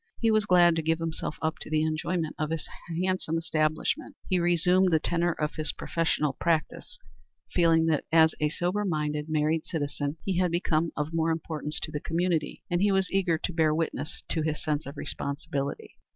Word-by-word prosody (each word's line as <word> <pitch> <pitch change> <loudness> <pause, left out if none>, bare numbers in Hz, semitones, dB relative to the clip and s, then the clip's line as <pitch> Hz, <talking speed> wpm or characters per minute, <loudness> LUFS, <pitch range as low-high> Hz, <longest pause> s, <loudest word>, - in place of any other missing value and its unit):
He 225 -1 +3
was 215 -1 +2
glad 175 -2 +6
to 165 - 0
give 160 +1 +1
himself 165 -2 -4
up 160 0 -1
to - - -8
the 155 0 +2
enjoyment 160 +1 -1
of 155 -1 -1
his 165 -1 -3 0.4
handsome 185 -3 0
establishment. 160 - -1
He 185 -2 +2
resumed 180 +2 +3
the 160 - +4
tenor 175 +2 +1
of 150 0 -2
his 155 -1 -3
professional 155 -3 0
practice, 160 +2 -1 0.5
feeling 165 -2 +4
that 160 -3 +1
as 160 0 +6
a 150 - +2
sober 180 +6 -1
minded, 150 -4 -1
married 155 +1 +1
citizen 145 -1 -3
he 185 -2 0
had 180 -1 +3
become 165 -1 +1
of 150 +2 -2
more 165 0 +1
importance 155 -2 -2
to 155 - -4
the 150 - -3
community, 170 +1 -1
and 175 0 0
he 205 0 +4
was 190 -1 +1
eager 185 -4 +2
to 180 - -4
bear 160 -2 +3
witness 160 -1 -3
to 160 - 0
his 155 0 -2
sense 150 -2 -1
of 140 +1 -8
responsibility. 140 0 -4
160 Hz, 190 wpm, -28 LUFS, 155-175 Hz, 0.5 s, glad